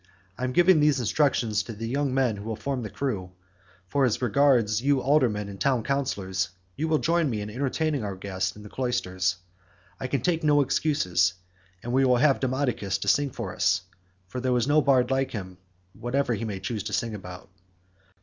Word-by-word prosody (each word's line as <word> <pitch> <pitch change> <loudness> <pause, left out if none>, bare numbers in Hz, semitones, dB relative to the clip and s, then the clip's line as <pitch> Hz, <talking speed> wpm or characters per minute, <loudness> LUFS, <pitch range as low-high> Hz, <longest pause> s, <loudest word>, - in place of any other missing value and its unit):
I 125 - -3
am 130 - -1
giving 175 +3 +5
these 150 -2 +3
instructions 120 -3 +1
to 115 - -7
the 110 +2 -6
young 140 +3 0
men 130 -4 +1
who 100 - -8
will 110 0 -3
form 135 +3 -3
the 110 - -5
crew, 100 -5 -3 0.5
for 140 +8 +1
as 125 -5 +2
regards 120 -3 +3
you 140 +1 +2
aldermen 125 -7 +2
and 100 -1 -9
town 130 -5 +2
councillors, 95 - -1 0.3
you 160 - -2
will 155 -1 +3
join 165 -1 +1
me 110 -4 -2
in 105 +1 -5
entertaining 140 +2 -1
our 100 -2 -4
guest 95 -1 -3
in 105 - -12
the 105 - -10
cloisters. 95 -9 -1 0.6
I 130 - -3
can 135 -1 -1
take 165 +4 0
no 145 -1 +4
excuses, 95 - +1 0.5
and 120 - -4
we 135 +1 +4
will 125 -2 +4
have 140 +1 +3
Demodocus 130 -6 -1
to - - -4
sing 140 +9 +3
to - - -6
us; 95 0 0 0.4
for 125 +7 -5
there 125 0 +1
is 120 +1 0
no 150 +1 +4
bard 135 -3 +3
like 135 0 +1
him 95 -4 -7 0.3
whatever 120 +2 -1
he 115 +1 -3
may 100 -3 -4
choose 105 +3 -3
to 105 - -4
sing 115 -2 -1
about." 90 -3 -9
125 Hz, 200 wpm, -26 LUFS, 105-140 Hz, 0.6 s, giving